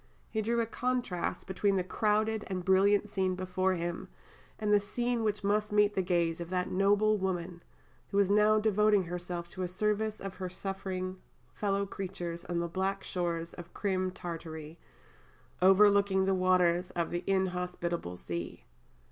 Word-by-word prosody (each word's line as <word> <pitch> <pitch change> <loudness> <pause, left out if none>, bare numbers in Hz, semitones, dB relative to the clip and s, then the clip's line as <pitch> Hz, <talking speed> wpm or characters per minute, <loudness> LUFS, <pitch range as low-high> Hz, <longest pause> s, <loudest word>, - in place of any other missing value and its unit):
He 220 - 0
drew 235 +2 0
a 230 - +2
contrast 245 -6 -2
between 195 +1 +1
the 185 - +1
crowded 215 +2 +1
and 185 -2 -4
brilliant 200 +2 +4
scene 190 -2 0
before 185 0 0
him, 170 0 -4 0.5
and 210 -1 +1
"the 205 - +6
scene 240 +3 -1
which 210 -1 -1
met 210 +1 +1
the 210 -2 +3
gaze 175 -2 0
of 170 - -6
that 180 0 -1
noble 205 +2 +3
woman, 175 -2 -3 0.5
who 200 - -2
was 200 -1 +5
now 210 +2 +4
devoting 210 -1 +3
herself 175 0 -5
to 185 - -7
the 180 - 0
service 210 +3 -1
of 195 -1 -7
her 185 -1 -4
suffering 185 0 -4 0.3
fellow 200 -1 0
creatures 175 -3 -5
on 175 - -2
the 170 0 0
black 190 +3 -2
shores 170 -2 -2
of 175 -1 -11
Crim 185 -2 0
Tartary, 165 -3 -7 0.8
overlooking 195 0 +5
the 195 - +2
waters 180 -1 +3
of 170 -1 -2
the 175 +1 -2
inhospitable 180 - -1
sea." 85 -1 -5
190 Hz, 155 wpm, -31 LUFS, 175-205 Hz, 0.8 s, the